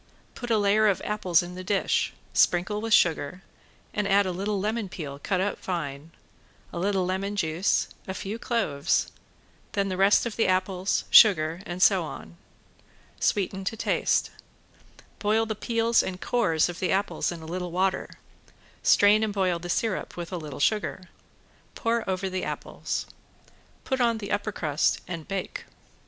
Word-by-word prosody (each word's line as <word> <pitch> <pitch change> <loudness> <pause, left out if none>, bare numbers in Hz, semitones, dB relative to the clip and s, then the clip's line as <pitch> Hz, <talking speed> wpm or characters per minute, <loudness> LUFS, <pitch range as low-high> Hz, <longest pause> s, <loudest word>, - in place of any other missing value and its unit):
Put 240 - -7
a 225 - +3
layer 210 +1 +3
of 200 - +2
apples 185 -5 +2
in 175 +1 -8
the 185 +1 -7
dish, 195 +1 +1 0.2
sprinkle 190 +4 +2
with 225 0 -4
sugar, 175 -1 +2 0.5
and 210 -1 -1
add 200 +1 +4
a 185 - -1
little 200 +3 -2
lemon 215 0 -2
peel, 140 -6 -7
cut 185 +5 -1
up 200 +2 -1
fine, 150 -4 -4 0.6
a - - -4
little 190 0 +1
lemon 195 +2 -2
juice, 170 -1 +1 0.2
a 190 - -4
few 205 +4 -5
cloves; 190 - 0 0.6
then 200 -1 0
the 185 - -3
rest 195 +4 +4
of 235 - -4
the 225 - +2
apples, 185 0 0
sugar 170 -5 +6
and 175 +1 -1
so 190 -4 +5
on. 160 - -9 0.8
Sweeten 195 -1 0
to 225 - -2
taste. - - +1 0.9
Boil 220 +2 +2
the 220 - -2
peels 230 +2 +2
and 185 -1 -5
cores 165 -11 +1
of 175 0 -7
the 185 - 0
apples 195 -1 0
in 170 -2 -8
a - - -9
little 180 +2 -4
water, 185 +2 0 0.7
strain 205 +1 +5
and 215 - 0
boil 185 -3 +1
the 175 +1 -7
syrup 215 +1 -2
with 175 0 -6
a 180 - -3
little 150 -5 -7
sugar. 190 +2 0 0.7
Pour 230 -3 -1
over 190 +1 -1
the 185 0 -3
apples. - - -4 0.8
Put 265 -2 -1
on 235 -2 +2
the 200 -2 -6
upper 205 +1 -1
crust 155 -5 0
and 170 -3 -6
bake. 195 -1 -4
190 Hz, 165 wpm, -26 LUFS, 175-210 Hz, 0.9 s, sugar